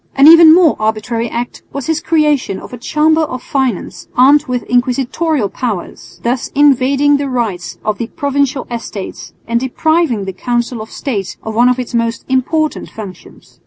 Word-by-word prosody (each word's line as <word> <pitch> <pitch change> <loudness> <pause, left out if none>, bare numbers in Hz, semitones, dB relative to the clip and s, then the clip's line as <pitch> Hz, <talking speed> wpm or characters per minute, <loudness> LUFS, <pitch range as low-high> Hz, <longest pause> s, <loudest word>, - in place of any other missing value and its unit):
An 275 +2 +6
even 330 0 +9
more 335 -2 +5
arbitrary 220 +2 -1
act 240 +2 -5
was 280 -3 -5
his 320 0 -1
creation 300 - +1
of - - -12
a - - -6
Chamber 310 +5 +2
of 255 -5 -4
Finance 245 -9 -2
armed 280 +4 +5
with 250 -1 -2
inquisitorial 255 +2 0
powers, 215 -5 -6
thus 240 +1 -1
invading 280 0 +3
the 280 -1 -3
rights 220 -8 -3
of 215 -1 -1
the 235 - -3
Provincial 280 -2 -1
Estates 220 -4 -6 0.2
and 235 +1 +1
depriving 265 - 0
the 190 - -5
Council 240 +2 -2
of 220 - -9
State 205 -9 -4
of 220 - -5
one 240 +3 +4
of 250 - +1
its 250 -1 -5
most 230 -1 -1
important 300 +4 -1
functions. 195 -5 -12
250 Hz, 165 wpm, -15 LUFS, 230-290 Hz, 0.2 s, even